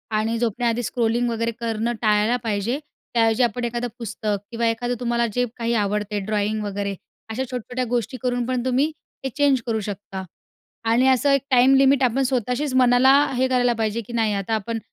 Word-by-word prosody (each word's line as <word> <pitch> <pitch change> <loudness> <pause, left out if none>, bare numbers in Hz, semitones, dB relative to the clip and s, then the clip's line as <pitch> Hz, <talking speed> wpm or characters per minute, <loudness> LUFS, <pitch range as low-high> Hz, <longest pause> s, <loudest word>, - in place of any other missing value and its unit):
आणि 225 +2 0
झोपण्याआधी 235 +1 0
स्क्रोलिंग 235 +1 0
वगैरे 230 0 -1
करणं 230 0 -1
टाळायला 215 +2 +3
पाहिजे. 225 +5 -1 0.3
त्याऐवजी 225 +1 +3
आपण 240 +1 -1
एखादं 240 +1 -2
पुस्तक 215 -2 -2
किंवा 230 0 0
एखादं 245 +2 -1
तुम्हाला 235 -1 0
जे 245 +2 +1
काही 235 0 -1
आवडते 210 +1 -1
ड्रॉईंग 210 +1 -1
वगैरे 200 -1 -3 0.3
अशा 245 +4 -2
छोट्या-छोट्या 250 0 -4
गोष्टी 245 +1 -1
करून 245 -1 0
पण 255 -1 -1
तुम्ही 265 +5 +2 0.3
ते 265 - -1
चेंज 280 -3 +3
करू 225 -2 -1
शकता 195 -2 -6 0.7
आणि 250 +3 +4
असं 265 +2 +3
एक 275 - +3
टाईम 255 +2 +6
लिमिट 270 0 +4
आपण 255 +2 +2
स्वतःशीच 255 +2 -1
मनाला 250 +1 +5 0.2
हे 260 +1 +2
करायला 245 -2 +2
पाहिजे, 225 0 -1
की 230 +3 -11
नाही 225 -3 +1
आता 200 +2 -2
आपण 225 +2 -3
235 Hz, 175 wpm, -23 LUFS, 220-250 Hz, 0.7 s, टाईम